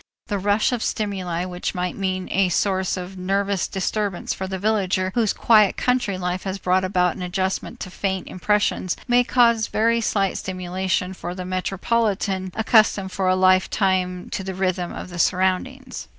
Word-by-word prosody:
The 205 Hz, -2 st, -1 dB
rush 205 Hz, +4 st, +2 dB
of 245 Hz, -3 st, -1 dB
stimuli 185 Hz, -6 st, -2 dB
which 180 Hz, -1 st, -4 dB
might 180 Hz, 0 st, -2 dB
mean 185 Hz, -2 st, -2 dB
a 190 Hz, -1 st, +2 dB
source 190 Hz, +1 st, 0 dB
of 185 Hz, +1 st, -7 dB
nervous 195 Hz, +1 st, 0 dB
disturbance 195 Hz, 0 st, -2 dB
for 190 Hz, -, -5 dB
the 190 Hz, 0 st, -3 dB
villager 190 Hz, -2 st, 0 dB
whose 225 Hz, -4 st, +2 dB
quiet 215 Hz, -4 st, +4 dB
country 250 Hz, -6 st, 0 dB
life 180 Hz, 0 st, -2 dB
has 190 Hz, 0 st, -4 dB
brought 185 Hz, 0 st, +1 dB
about 180 Hz, -2 st, +1 dB
an -, -, -8 dB
adjustment 185 Hz, +1 st, -2 dB
to 185 Hz, -, -6 dB
faint 190 Hz, -1 st, -2 dB
impressions 205 Hz, -2 st, 0 dB
may 245 Hz, 0 st, +4 dB
cause 235 Hz, -3 st, +3 dB
very 230 Hz, +2 st, +2 dB
slight 195 Hz, -3 st, 0 dB
stimulation 185 Hz, 0 st, -2 dB
for 175 Hz, -1 st, -6 dB
the 185 Hz, -1 st, -5 dB
metropolitan 190 Hz, 0 st, -1 dB
accustomed 215 Hz, -3 st, +3 dB
for 185 Hz, 0 st, -1 dB
a 185 Hz, -, +4 dB
lifetime 185 Hz, -1 st, +2 dB
to 210 Hz, -5 st, -3 dB
the 190 Hz, 0 st, -5 dB
rhythm 185 Hz, -2 st, -1 dB
of -, -, -7 dB
the 175 Hz, -, -7 dB
surroundings. 190 Hz, +10 st, 0 dB
190 Hz, 165 wpm, -22 LUFS, 185-205 Hz, -, quiet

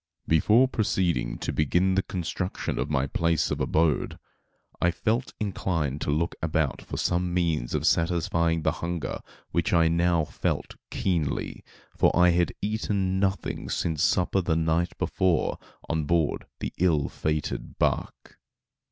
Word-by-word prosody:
Before 105 Hz, +11 st, +5 dB
proceeding 85 Hz, -, 0 dB
to -, -, -3 dB
begin 90 Hz, +6 st, +2 dB
the 95 Hz, -, +3 dB
construction 90 Hz, 0 st, -3 dB
of 65 Hz, -, -1 dB
my 70 Hz, -2 st, +1 dB
place 85 Hz, +3 st, 0 dB
of -, -, -1 dB
abode, 80 Hz, -2 st, +1 dB, 0.6 s
I 85 Hz, -, +4 dB
felt 110 Hz, +8 st, -1 dB
inclined 85 Hz, -8 st, -2 dB
to -, -, -2 dB
look 80 Hz, +3 st, 0 dB
about 80 Hz, -3 st, 0 dB
for -, -, -7 dB
some 90 Hz, 0 st, 0 dB
means 85 Hz, -8 st, 0 dB
of -, -, -1 dB
satisfying 85 Hz, -1 st, +1 dB
the -, -, +3 dB
hunger 85 Hz, -3 st, -3 dB, 0.3 s
which 85 Hz, +2 st, 0 dB
I 85 Hz, -1 st, +5 dB
now 85 Hz, -1 st, +2 dB
felt -, -, -3 dB
keenly, 85 Hz, -7 st, -2 dB, 0.3 s
for -, -, +4 dB
I 90 Hz, 0 st, +6 dB
had 85 Hz, 0 st, +2 dB
eaten 100 Hz, -3 st, 0 dB
nothing 95 Hz, -3 st, -1 dB
since 80 Hz, -3 st, -1 dB
supper 90 Hz, +2 st, +2 dB
the 85 Hz, -2 st, 0 dB
night 80 Hz, +2 st, 0 dB
before 90 Hz, -4 st, +1 dB, 0.3 s
on 80 Hz, -2 st, -1 dB
board 80 Hz, -1 st, 0 dB
the -, -, -3 dB
ill 80 Hz, -6 st, +3 dB
fated 75 Hz, -1 st, -3 dB
bark. -, -, -2 dB
85 Hz, 145 wpm, -26 LUFS, 80-90 Hz, 0.6 s, I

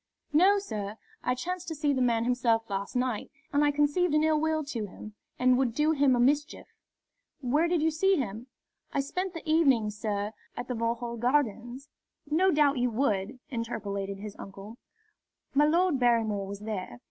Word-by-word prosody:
"No, 375 Hz, +7 st, +6 dB
sir. 215 Hz, -, -5 dB, 0.3 s
I 250 Hz, -, +1 dB
chanced 360 Hz, +6 st, -4 dB
to 320 Hz, -, -4 dB
see 290 Hz, -1 st, +1 dB
the 260 Hz, -, 0 dB
man 235 Hz, -2 st, +2 dB
himself 235 Hz, -2 st, +1 dB
last 195 Hz, +3 st, -3 dB
night, 250 Hz, -3 st, -1 dB, 0.2 s
and 290 Hz, +1 st, +3 dB
I 295 Hz, -, +4 dB
conceived 295 Hz, +3 st, +2 dB
an 305 Hz, -, +3 dB
ill 315 Hz, -1 st, +3 dB
will 315 Hz, 0 st, +1 dB
to 235 Hz, -7 st, -4 dB
him, 215 Hz, +3 st, -11 dB, 0.2 s
and 255 Hz, 0 st, +4 dB
would 245 Hz, -4 st, 0 dB
do 305 Hz, +1 st, +3 dB
him 280 Hz, -4 st, +3 dB
a -, -, 0 dB
mischief." 290 Hz, +5 st, +1 dB, 0.8 s
"Where 290 Hz, +6 st, +2 dB
did 340 Hz, -3 st, +1 dB
you 320 Hz, -, +3 dB
see 385 Hz, +5 st, +3 dB
him?" 235 Hz, -, -4 dB, 0.4 s
"I 285 Hz, -, -1 dB
spent 365 Hz, +6 st, -4 dB
the 330 Hz, -, -8 dB
evening, 270 Hz, -9 st, +3 dB
sir, 210 Hz, -1 st, -3 dB, 0.3 s
at 245 Hz, -, -4 dB
the 250 Hz, -, -2 dB
Vauxhall 235 Hz, +1 st, -2 dB
Gardens." 245 Hz, +1 st, 0 dB, 0.4 s
"No 320 Hz, +6 st, +3 dB
doubt 290 Hz, -5 st, +3 dB
you 245 Hz, 0 st, +2 dB
would," 220 Hz, -1 st, -1 dB
interpolated 200 Hz, -5 st, -3 dB
his 205 Hz, 0 st, -8 dB
uncle. 200 Hz, +4 st, -10 dB, 0.7 s
"My 290 Hz, +2 st, +5 dB
Lord 335 Hz, -1 st, +2 dB
Barrymore 225 Hz, -5 st, +2 dB
was 200 Hz, +1 st, -7 dB
there. 190 Hz, -, -5 dB
250 Hz, 180 wpm, -28 LUFS, 220-300 Hz, 0.8 s, No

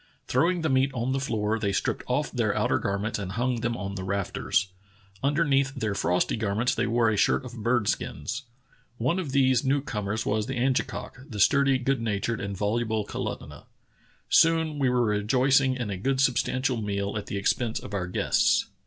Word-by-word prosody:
Throwing 170 Hz, +7 st, +1 dB
the 160 Hz, -, +1 dB
meat 130 Hz, +1 st, +3 dB
on 120 Hz, +2 st, -1 dB
the 135 Hz, -, 0 dB
floor, 110 Hz, -4 st, -1 dB
they 100 Hz, -2 st, 0 dB
stripped 95 Hz, -, -1 dB
off -, -, 0 dB
their -, -, 0 dB
outer -, -, +1 dB
garments 100 Hz, +2 st, -2 dB
and 95 Hz, -2 st, -5 dB
hung 120 Hz, +2 st, 0 dB
them 120 Hz, 0 st, -1 dB
on 100 Hz, 0 st, -4 dB
the 95 Hz, -1 st, -5 dB
rafters. 95 Hz, 0 st, -1 dB, 0.5 s
Underneath 140 Hz, -2 st, +2 dB
their 110 Hz, -6 st, -1 dB
frosty 90 Hz, -2 st, +1 dB
garments 110 Hz, +2 st, 0 dB
they 120 Hz, +2 st, 0 dB
wore 115 Hz, -1 st, +2 dB
a -, -, 0 dB
shirt 130 Hz, -, +2 dB
of 120 Hz, -2 st, -8 dB
bird 120 Hz, -1 st, +1 dB
skins. 110 Hz, -, -2 dB, 0.6 s
One 150 Hz, +11 st, 0 dB
of 160 Hz, -7 st, -4 dB
these 130 Hz, -2 st, +3 dB
new 140 Hz, +1 st, +2 dB
comers 105 Hz, -5 st, -3 dB
was 105 Hz, +1 st, 0 dB
the 135 Hz, -, -3 dB
Angekok, 130 Hz, +1 st, -2 dB
the 105 Hz, -4 st, -6 dB
sturdy, 140 Hz, +5 st, +4 dB
good 130 Hz, -1 st, 0 dB
natured, 110 Hz, 0 st, -1 dB
and 100 Hz, -1 st, -4 dB
voluble 110 Hz, +1 st, 0 dB
Kalutunah. -, -, -6 dB, 0.6 s
Soon 160 Hz, -2 st, +3 dB
we 135 Hz, -2 st, +3 dB
were 125 Hz, -1 st, +2 dB
rejoicing 130 Hz, +5 st, +2 dB
in 120 Hz, -5 st, -3 dB
a 95 Hz, -, -3 dB
good 130 Hz, +7 st, 0 dB
substantial 130 Hz, 0 st, +1 dB
meal 100 Hz, -1 st, -2 dB
at 105 Hz, -, -4 dB
the 100 Hz, -, -3 dB
expense 110 Hz, +3 st, 0 dB
of 100 Hz, -, -10 dB
our 90 Hz, -3 st, -2 dB
guests." 90 Hz, -, +2 dB
120 Hz, 190 wpm, -26 LUFS, 105-135 Hz, 0.6 s, sturdy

